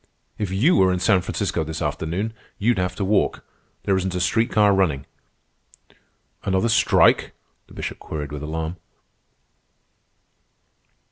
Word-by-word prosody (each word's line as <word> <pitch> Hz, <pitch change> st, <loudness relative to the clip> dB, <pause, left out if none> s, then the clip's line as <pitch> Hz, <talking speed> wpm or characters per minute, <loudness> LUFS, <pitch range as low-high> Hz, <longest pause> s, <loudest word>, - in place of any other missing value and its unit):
If 105 Hz, -, -1 dB
you 115 Hz, -, +3 dB
were 95 Hz, -1 st, +4 dB
in 90 Hz, -, 0 dB
San 95 Hz, -1 st, +3 dB
Francisco 80 Hz, -, -2 dB
this 80 Hz, 0 st, -5 dB
afternoon, 95 Hz, +8 st, -2 dB, 0.2 s
you'd 110 Hz, -1 st, +1 dB
have 90 Hz, 0 st, -1 dB
to 100 Hz, -, -2 dB
walk. 100 Hz, +1 st, +1 dB, 0.4 s
There 95 Hz, -, +2 dB
isn't 95 Hz, -1 st, -1 dB
a -, -, -1 dB
street 110 Hz, +6 st, +1 dB
car 105 Hz, -2 st, +4 dB
running." 80 Hz, -8 st, +1 dB, 1.4 s
"Another 95 Hz, +4 st, +1 dB
strike?" 115 Hz, -, +4 dB, 0.3 s
the -, -, -16 dB
Bishop -, -, -5 dB
queried 75 Hz, -2 st, -6 dB
with 75 Hz, -1 st, -6 dB
alarm. 80 Hz, +3 st, -4 dB
95 Hz, 135 wpm, -23 LUFS, 80-105 Hz, 1.4 s, were